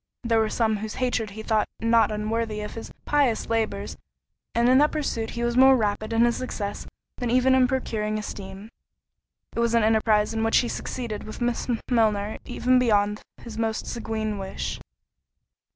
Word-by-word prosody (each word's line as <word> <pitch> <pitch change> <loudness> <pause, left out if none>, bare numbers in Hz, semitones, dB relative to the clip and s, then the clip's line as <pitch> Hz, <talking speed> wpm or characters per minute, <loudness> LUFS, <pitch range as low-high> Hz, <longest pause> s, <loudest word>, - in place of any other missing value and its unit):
There 230 -1 +2
were 220 -1 +1
some 220 -2 +1
whose 215 +1 -5
hatred 245 -4 -1
he 220 +2 -8
thought 220 -1 +1
not 230 0 +3
unworthy 215 0 -2
of 210 - -6
his 225 - -8
pious 280 -6 +1
labours; 220 -3 -1 0.6
and 235 +1 +3
in 255 +1 +6
that 300 +1 +4
pursuit 255 -7 -2
he 235 - -1
was 240 0 0
more 265 +1 +7
rapid 215 0 -1
in 230 +1 +4
his 240 - +1
success 205 -5 -5 0.3
than 245 -2 -2
even 255 +2 +4
in 260 -1 +5
procuring 215 -5 -2
esteem. 200 0 -7 0.8
It - - -2
was 235 0 +2
an 230 - +4
enterprise 220 -1 +3
in 225 0 -1
which 225 - +3
he 245 - +2
succeeded 230 -5 -4
with 215 - -8
Miss 240 -1 -1 0.2
Milner 215 -3 +1
even 250 0 +2
beyond 210 -3 +2 0.2
his 225 -1 -8
most 225 -1 -1
sanguine 220 -3 -3
wish. 190 0 -4
225 Hz, 175 wpm, -25 LUFS, 215-240 Hz, 0.8 s, more